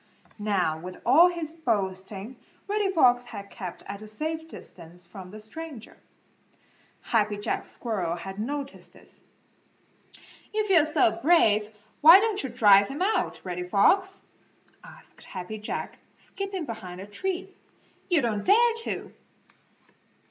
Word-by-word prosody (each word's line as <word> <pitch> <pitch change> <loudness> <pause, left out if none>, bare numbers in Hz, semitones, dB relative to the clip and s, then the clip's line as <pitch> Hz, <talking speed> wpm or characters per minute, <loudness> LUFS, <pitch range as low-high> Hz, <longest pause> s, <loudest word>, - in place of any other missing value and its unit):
Now, 190 -7 0
with 180 +2 -9
all 300 +9 +7
his 330 -3 -5
boasting 205 - -3 0.3
Reddy 410 -1 0
Fox 245 -8 +4
had 200 -4 -9
kept 185 -6 -8
at 200 +1 -8
a 215 - -9
safe 315 +8 -4
distance 175 - -11
from 185 0 -11
the 215 +3 -10
stranger. 265 +2 -9 1.1
Happy 210 -2 0
Jack 205 - -3
Squirrel 190 -8 -3
had 190 +3 -8
noticed 280 +4 -5
this. - - -16 1.3
"If 425 -2 0
you're 330 -5 +6
so 340 +3 +2
brave, 215 -12 +4 0.3
why 330 +5 +10
don't 425 -1 0
you 265 - -4
drive 205 -4 +6
him 290 +7 -3
out, 435 +3 0
Reddy 180 -1 -5
Fox?" 380 - +3 0.6
asked - - -15
Happy 190 +3 -7
Jack, 210 - -5 0.2
skipping 390 -4 -6
behind 185 -7 -7
a 190 - -7
tree. 375 - -4 0.6
"You 335 -6 +3
don't 215 -3 -1
dare 465 +4 +5
to!" - - -5
230 Hz, 135 wpm, -26 LUFS, 200-335 Hz, 1.3 s, why